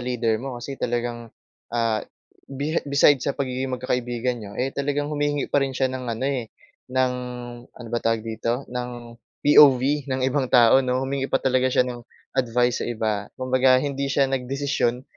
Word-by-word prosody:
leader 120 Hz, -3 st, -1 dB
mo, 130 Hz, -1 st, -5 dB
kasi 135 Hz, +3 st, -7 dB
talagang, 120 Hz, -1 st, -2 dB, 0.4 s
ah, 115 Hz, -2 st, 0 dB, 0.5 s
bihi 145 Hz, +4 st, -2 dB
beside 140 Hz, 0 st, +5 dB
sa 140 Hz, -, -1 dB
pagiging 130 Hz, -1 st, -2 dB
magkakaibigan 125 Hz, -1 st, -2 dB
niyo, 100 Hz, -2 st, -9 dB
eh, 135 Hz, +2 st, -1 dB
talagang 145 Hz, +1 st, -2 dB
humihingi 145 Hz, -1 st, -1 dB
pa 145 Hz, -, +4 dB
rin 135 Hz, -2 st, -2 dB
siya 130 Hz, -1 st, +1 dB
ng 130 Hz, -1 st, -5 dB
ano 115 Hz, +2 st, -3 dB
eh, 130 Hz, -5 st, -1 dB, 0.4 s
ng 130 Hz, 0 st, +1 dB, 0.6 s
ano 120 Hz, -, -12 dB
bang 120 Hz, -, -2 dB
tawag 115 Hz, -1 st, +1 dB
dito? 115 Hz, +3 st, -2 dB
Ng 125 Hz, 0 st, -3 dB, 0.5 s
POV 140 Hz, -3 st, +7 dB, 0.3 s
ng 130 Hz, 0 st, -1 dB
ibang 135 Hz, 0 st, +1 dB
tao 120 Hz, 0 st, +6 dB
'no, 130 Hz, 0 st, 0 dB
humingi 135 Hz, 0 st, -2 dB
pa 135 Hz, -, +2 dB
talaga 130 Hz, -1 st, +2 dB
siya 125 Hz, -, +3 dB
ng 125 Hz, -1 st, -6 dB, 0.4 s
advice 125 Hz, -1 st, +1 dB
sa -, -, -3 dB
iba. 110 Hz, -3 st, -2 dB
Kumbaga, 130 Hz, 0 st, +3 dB
hindi 140 Hz, -1 st, -2 dB
siya 140 Hz, 0 st, +3 dB
nagdesisyon 130 Hz, -1 st, -1 dB
130 Hz, 170 wpm, -24 LUFS, 120-135 Hz, 0.6 s, POV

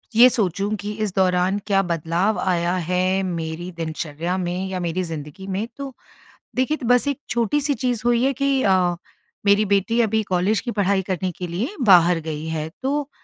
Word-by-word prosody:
ये 245 Hz, +2 st, +9 dB
सोचूँ 200 Hz, -2 st, -1 dB
कि 205 Hz, -, -4 dB
इस 200 Hz, -, -2 dB
दौरान 185 Hz, 0 st, +2 dB
क्या 195 Hz, -2 st, +3 dB
बदलाव 170 Hz, +4 st, 0 dB
आया 175 Hz, -1 st, +1 dB
है 185 Hz, +1 st, +1 dB
मेरी 170 Hz, -1 st, -4 dB
दिनचर्या 165 Hz, +2 st, -3 dB
में 180 Hz, +1 st, -2 dB
या 185 Hz, -1 st, -3 dB
मेरी 175 Hz, +1 st, -1 dB
ज़िंदगी 160 Hz, +3 st, -7 dB
में 195 Hz, +3 st, -2 dB
तो 275 Hz, -1 st, -6 dB, 0.6 s
देखिए 260 Hz, +5 st, +1 dB
तो 265 Hz, -, -7 dB
बस 245 Hz, +3 st, +4 dB
एक 280 Hz, -1 st, -1 dB
छोटी-सी 280 Hz, +5 st, +1 dB
चीज़ 250 Hz, -4 st, -1 dB
हुई 240 Hz, 0 st, +3 dB
है 270 Hz, +1 st, +2 dB
कि 275 Hz, +2 st, 0 dB
अ, 195 Hz, -, +4 dB, 0.7 s
मेरी 200 Hz, +1 st, +4 dB
बेटी 200 Hz, +4 st, +1 dB
अभी 220 Hz, -1 st, +1 dB
कॉलेज 190 Hz, +2 st, +1 dB
की 245 Hz, -, -4 dB
पढ़ाई 200 Hz, -2 st, +1 dB
करने 185 Hz, 0 st, -1 dB
के 180 Hz, +1 st, -6 dB
लिए 210 Hz, -, -3 dB, 0.2 s
बाहर 175 Hz, -1 st, +6 dB
गई 155 Hz, 0 st, -4 dB
है। 160 Hz, -1 st, -3 dB
तो 285 Hz, +2 st, -1 dB
190 Hz, 180 wpm, -22 LUFS, 175-235 Hz, 0.7 s, ये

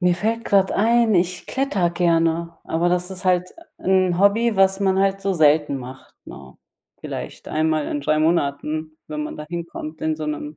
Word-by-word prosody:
Mir 180 Hz, -1 st, +2 dB
fällt 230 Hz, +3 st, -1 dB
grad 195 Hz, -1 st, +2 dB
ein, 230 Hz, 0 st, +3 dB
ich 180 Hz, 0 st, 0 dB
klettere 265 Hz, -10 st, 0 dB
gerne, 170 Hz, -1 st, +1 dB
aber 170 Hz, +2 st, 0 dB
das 180 Hz, +1 st, 0 dB
is 185 Hz, +1 st, -8 dB
halt 180 Hz, 0 st, +2 dB, 0.3 s
'n 185 Hz, -2 st, +2 dB
Hobby, 210 Hz, +3 st, +3 dB
was 195 Hz, 0 st, +3 dB
man 190 Hz, -1 st, +2 dB
halt 195 Hz, 0 st, +1 dB
so 195 Hz, 0 st, -1 dB
selten 150 Hz, -3 st, +3 dB
macht, 130 Hz, +1 st, -10 dB
ne? 65 Hz, -2 st, -12 dB, 0.4 s
Vielleicht -, -, -7 dB
einmal 155 Hz, -1 st, 0 dB
in 145 Hz, -, -3 dB
3 155 Hz, +2 st, +1 dB
Monaten, 155 Hz, 0 st, -1 dB
wenn 150 Hz, 0 st, -4 dB
man 150 Hz, -, -6 dB
da 150 Hz, -, -7 dB
hinkommt 170 Hz, -2 st, -6 dB
in 155 Hz, 0 st, -1 dB
so 155 Hz, -, -5 dB
'nem 150 Hz, 0 st, -5 dB
175 Hz, 180 wpm, -22 LUFS, 155-190 Hz, 0.4 s, ein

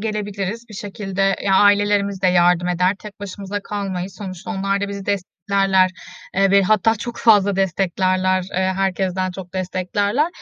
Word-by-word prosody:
gelebiliriz. 210 Hz, +1 st, -4 dB
Bir 215 Hz, -, -11 dB
şekilde, 195 Hz, -1 st, -2 dB
ya, 195 Hz, -1 st, +2 dB
ailelerimiz 205 Hz, -1 st, +3 dB
de -, -, +4 dB
yardım 180 Hz, 0 st, +3 dB
eder, 180 Hz, +2 st, +2 dB
tek 210 Hz, -2 st, -12 dB
başımıza 200 Hz, 0 st, -5 dB
kalmayız. 195 Hz, -2 st, -4 dB
Sonuçta 185 Hz, -4 st, -7 dB
onlar 195 Hz, +1 st, -1 dB
da 200 Hz, -, -2 dB
bizi 200 Hz, -1 st, -6 dB
desteklerler, 195 Hz, -1 st, +1 dB, 0.4 s
eee, 195 Hz, +1 st, +3 dB
ve 200 Hz, 0 st, +5 dB
hatta 215 Hz, +2 st, +3 dB
çok 235 Hz, +2 st, -6 dB
fazla 200 Hz, -3 st, +4 dB
desteklerler, 185 Hz, 0 st, +1 dB
eee, 190 Hz, 0 st, -1 dB
herkesten 190 Hz, -1 st, -1 dB
çok 185 Hz, 0 st, -10 dB
desteklerler. 200 Hz, -, 0 dB
195 Hz, 150 wpm, -20 LUFS, 185-205 Hz, 0.4 s, ve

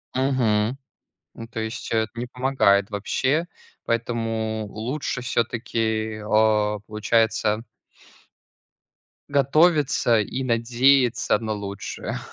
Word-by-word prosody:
Мгм, 125 Hz, -3 st, +1 dB, 0.6 s
ну, 115 Hz, -, -8 dB
то 115 Hz, 0 st, -6 dB
есть 110 Hz, +1 st, -5 dB
это 110 Hz, -1 st, 0 dB
не 120 Hz, +1 st, -3 dB
помогает 125 Hz, -6 st, +2 dB
вообще, 130 Hz, -, 0 dB, 0.4 s
поэтому 115 Hz, -2 st, -2 dB
лучше 125 Hz, +5 st, -4 dB
всё-таки, 110 Hz, -3 st, -1 dB
а, 105 Hz, -1 st, +2 dB
получается 110 Hz, 0 st, +1 dB, 1.7 s
готовиться 140 Hz, -3 st, +3 dB
и 120 Hz, +5 st, -2 dB
надеяться 125 Hz, +1 st, +3 dB
на 110 Hz, -2 st, -3 dB
лучшее. 100 Hz, -1 st, -5 dB
115 Hz, 90 wpm, -23 LUFS, 110-130 Hz, 1.7 s, готовиться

